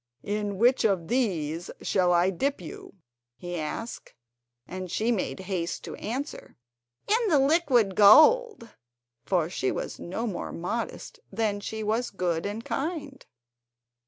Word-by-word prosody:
"In 205 -1 -2
which 245 +5 +4
of 190 -6 +1
these 175 - -1
shall 180 -2 +1
I 175 +2 +3
dip 275 +10 -1
you?" 175 +3 -10 0.4
he 175 0 -6
asked; 190 +10 -6 0.5
and 185 0 -6
she 225 +7 0
made 195 -3 -2
haste 180 -3 -3
to - - -7
answer: 260 +7 -5 0.5
"In 450 +2 +2
the 320 -7 +4
liquid 270 - +3
gold," 390 - +6 0.6
for 175 -5 +2
she 165 -7 -1
was - - -5
no 190 +7 -4
more 205 -6 -4
modest 230 - -5
than 210 -3 -1
she 220 +2 -5
was 225 +4 0
good 180 -2 -1
and 215 +3 -5
kind. 285 -3 -4
210 Hz, 135 wpm, -27 LUFS, 180-260 Hz, 0.6 s, gold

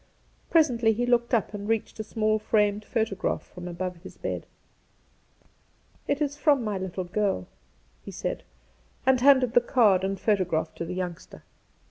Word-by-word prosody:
Presently 245 -9 +3
he 240 +3 -1
looked 240 -1 +2
up 230 -3 +1
and 205 +1 -5
reached 225 0 -1
a - - -2
small 215 0 0
framed 210 -1 +1
photograph 220 -4 -1
from 180 0 -10
above 180 +1 -4
his 170 - -13
bed., - - -4 0.8
' - - -36
It 290 +2 +1
is 285 -1 -2
from 290 -3 +3
my 210 -3 -2
little 185 0 -4
girl,' 180 - -1 0.6
he - - -9
said, - - -4 0.6
and 260 -1 +4
handed 260 -3 +5
the 245 - +6
card 215 -7 +3
and 195 0 -2
photograph 180 -7 0
to 170 - -5
the 180 +2 -5
youngster. 180 -2 -6
215 Hz, 160 wpm, -26 LUFS, 185-240 Hz, 0.8 s, the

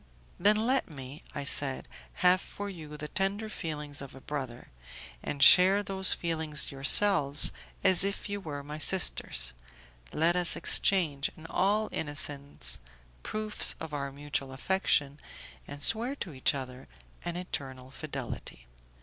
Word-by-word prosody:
"Then 210 +1 +4
let 250 +5 0
me," 135 -1 -10
I 145 - -4
said, 140 -1 +1 0.4
"have 180 +1 +5
for 205 0 -7
you 155 -4 -10
the 150 +1 -7
tender 200 +5 -3
feelings 150 -7 -6
of 140 -1 -11
a - - -11
brother, 130 -4 -7 0.5
and 140 -1 -1
share 185 +10 +8
those 190 -1 +2
feelings 160 -5 -1
yourselves 140 +1 +4 0.3
as 185 -1 +6
if 200 +1 -4
you 205 0 -5
were 145 -5 -7
my 150 +2 -8
sisters; 65 - +2 0.6
let 165 +3 +1
us 180 -1 +4
exchange, 155 -8 +1
in 160 - -14
all 210 +3 0
innocence, 145 - -1 0.4
proofs 215 0 +1
of 160 -2 -8
our 140 -1 -4
mutual 140 -1 -5
affection, 145 -2 0 0.5
and 145 0 -7
swear 235 +5 +3
to 180 - -7
each 130 +2 +1
other 130 - -8 0.4
an 175 - -5
eternal 130 -7 -7
fidelity." 135 - -8
150 Hz, 140 wpm, -29 LUFS, 140-190 Hz, 0.6 s, share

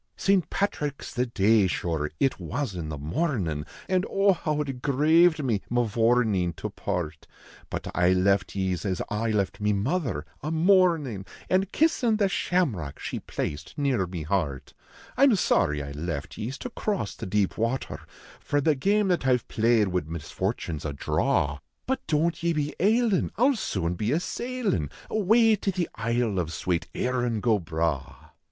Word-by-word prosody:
St. 195 -5 +2
Patrick 150 -8 -1
s - - -8
the 125 +1 0
dav, 110 -2 +3
shure, 80 -4 -1
it 135 - +1
was 140 -5 -3
in 85 -4 -5
the 75 - -4
mornin, 80 - -2 0.2
An 185 -1 +2
oh! 195 0 +4
how 155 -4 -2
it 135 -4 -4
graved 155 +4 +4
me, 115 -6 0
Mavourneen, 115 -5 +2
to - - -5
part; 80 -3 -4 0.4
But - - -4
I 90 +1 +3
left 95 +1 +2
ye 95 -1 0
s 85 - -4
as 95 -2 -1
I 110 +2 -1
left 105 -2 -1
me 105 0 +2
mother, 115 - -1 0.2
a 150 - -3
mournin 160 - +3 0.2
An 185 +1 +3
kissin 245 - +2
the 205 -2 +3
shamrock 135 - -1
she - - -4
placed 75 - -5
near 130 -10 +1
me 85 -3 -5
heart. 75 -5 -2 0.4
I 275 - +6
m 260 -6 +5
sorry 75 - +2
I 70 - -7
left 75 0 -4
ye 110 - -4
s 135 +2 -5
to 250 - -6
cross 200 - -2
the - - -7
deep 100 0 +1
water, 115 +4 -2 0.4
For 145 - 0
the 155 +2 +3
game 200 +9 +2
that 175 -7 +1
I 130 - +5
ve - - -13
played 110 -2 +2
wid 90 -4 -2
misfortune 80 0 -3
s 75 - -9
a 75 - -2
draw; 70 +1 0 0.3
But 265 +1 -2
don 160 +2 +2
t 170 +1 -5
ye 170 - +3
be 150 -1 -2
ailin, 220 0 +3
I 235 - +2
ll 280 - +2
soon 90 - -2
be 105 +8 -1
a 160 - +2
sailin 210 - -2 0.2
Awav 220 +1 +4
to 195 - +1
the 180 -2 -1
isle 115 -3 0
of 80 -2 -2
swate 85 +1 -1
" - - -21
Krin 125 -3 0
go 110 -2 +2
Bragli." 80 -4 -2
120 Hz, 185 wpm, -26 LUFS, -, 0.4 s, I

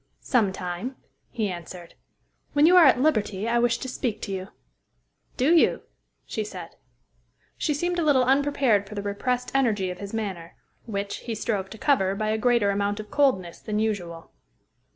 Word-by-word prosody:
"Some 225 -7 +2
time," 185 +7 -5 0.3
he 220 -3 -2
answered. 175 -1 -8 0.6
"When 290 0 +5
you 355 +3 +6
are 355 -3 +8
at 260 - +4
liberty, 215 -8 +1
I 235 +1 +2
wish 235 0 +2
to 260 - -6
speak 240 -4 -3
to 200 - -4
you." 190 0 -4 0.9
"Do 275 +7 +3
you?" 330 - +3 0.4
she 220 - -3
said. 180 -5 -9 0.8
She 300 - -1
seemed 350 +4 -1
a - - +1
little 280 -4 +4
unprepared 265 -6 +2
for 210 - -8
the 200 - -4
repressed 245 +5 -2
energy 215 -9 +1
of 180 - -9
his 200 0 -7
manner, 190 -7 -5 0.3
which, 200 -2 -3
he 230 -2 -5
strove 205 -3 -2
to 220 - -10
cover 195 -8 +2
by 215 +1 -2
a 220 - +1
greater 235 -3 +3
amount 200 +1 -1
of 210 -1 -8
coldness 190 -12 +1
than 210 -1 -3
usual. 180 -7 -3
215 Hz, 175 wpm, -25 LUFS, 195-255 Hz, 0.9 s, are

